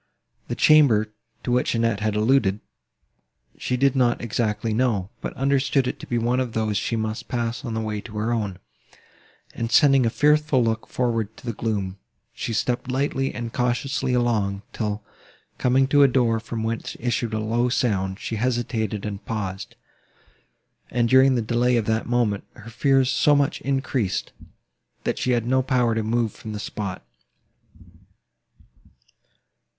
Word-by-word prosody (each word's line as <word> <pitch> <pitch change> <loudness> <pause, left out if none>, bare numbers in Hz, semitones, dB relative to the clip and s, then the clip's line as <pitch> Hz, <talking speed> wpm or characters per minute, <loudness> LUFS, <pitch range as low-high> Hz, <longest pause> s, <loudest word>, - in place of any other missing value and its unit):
The - - -3
chamber, 115 -9 +5 0.3
to 125 - -2
which 125 0 +1
Annette 115 -3 +1
had 105 0 -1
alluded, 110 -2 +2 1.0
she 125 - -1
did 135 +1 +3
not 125 -2 +2
exactly 110 -1 -1
know, 110 -5 0
but - - -4
understood 135 0 +1
it - - -4
to - - -9
be 120 - -1
one 120 +2 +1
of 125 -3 -2
those 110 -2 -1
she 105 +3 -1
must 110 +1 -3
pass 120 +1 -2
in 115 -4 -4
the 110 - -1
way 105 -1 -3
to 105 0 -9
her 110 +3 0
own; 105 -5 -2 1.0
and, 115 0 -3
sending 135 -1 +5
a - - +3
fearful 150 0 +3
look 115 0 -1
forward 115 -4 -1
into 110 - -17
the 120 - -2
gloom, 100 -3 -3 0.3
she - - -4
stepped 120 +3 -1
lightly 135 0 0
and 115 -1 -5
cautiously 125 +2 0
along, 105 -5 0
till, 105 -1 -3 0.6
coming 130 +1 +3
to 145 0 +5
a 140 - +8
door, 120 -3 +2
from 110 0 -5
whence 115 +1 -3
issued 120 -2 -1
a - - -1
low 115 +3 0
sound, 95 -6 0
she 110 - -4
hesitated 115 -3 -1
and 100 -1 -5
paused; 95 -4 -4 1.1
and, 120 -1 +1
during 130 +1 +6
the 120 - 0
delay 120 +2 +2
of 115 - 0
that 110 0 0
moment, 120 -4 +1
her 110 +2 -11
fears 135 +2 +2
so 150 - +4
much 145 0 +1
increased, 135 -7 -1 0.7
that - - -1
she - - -1
had 120 -2 0
no 130 +2 +2
power 125 -3 +1
to 110 - 0
move 115 0 0
from 110 - -8
the 105 - -5
spot. 100 -3 -5
115 Hz, 165 wpm, -24 LUFS, 110-125 Hz, 1.1 s, a